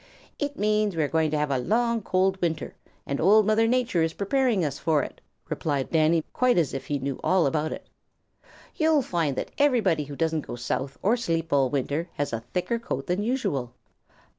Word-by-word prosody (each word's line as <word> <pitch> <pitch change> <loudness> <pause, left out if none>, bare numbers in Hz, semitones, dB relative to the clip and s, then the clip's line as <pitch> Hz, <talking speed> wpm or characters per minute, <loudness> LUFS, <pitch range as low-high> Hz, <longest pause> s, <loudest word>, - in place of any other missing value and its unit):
"It 290 -1 -3
means 210 -2 +1
we 160 - +1
are - - +1
going 160 +1 +1
to 155 - -1
have 150 -1 0
a 135 - +1
long, 235 - +1
hard, 215 - -7
cold 190 +1 +1
winter, 165 -2 -2 0.3
and 140 - -2
Old 210 +5 +6
Mother 215 +2 +3
Nature 240 -7 +1
is 160 0 0
preparing 220 - +1
us 140 -2 -3
for 155 -4 +2
it," - - -9 0.3
replied 140 -4 -2
Danny, 160 0 +3
quite 250 -3 +2
as 165 -5 +1
if 135 - -5
he 145 - 0
knew 135 0 -4
all 185 -2 +3
about 155 +2 0
it. - - -7 0.9
"You'll 315 -3 +3
find 165 - -1
that - - -4
everybody 220 - +3
who 145 0 -8
doesn't 160 0 0
go - - -5
south 130 +3 -3
or 215 +5 +4
sleep 165 -8 -2
all 135 -2 +3
winter 145 +5 -2
has 145 -4 -3
a 115 - -1
thicker 230 +6 -1
coat 140 - -4
than 180 +3 -1
usual. 145 - -2
165 Hz, 205 wpm, -26 LUFS, 145-215 Hz, 0.9 s, Old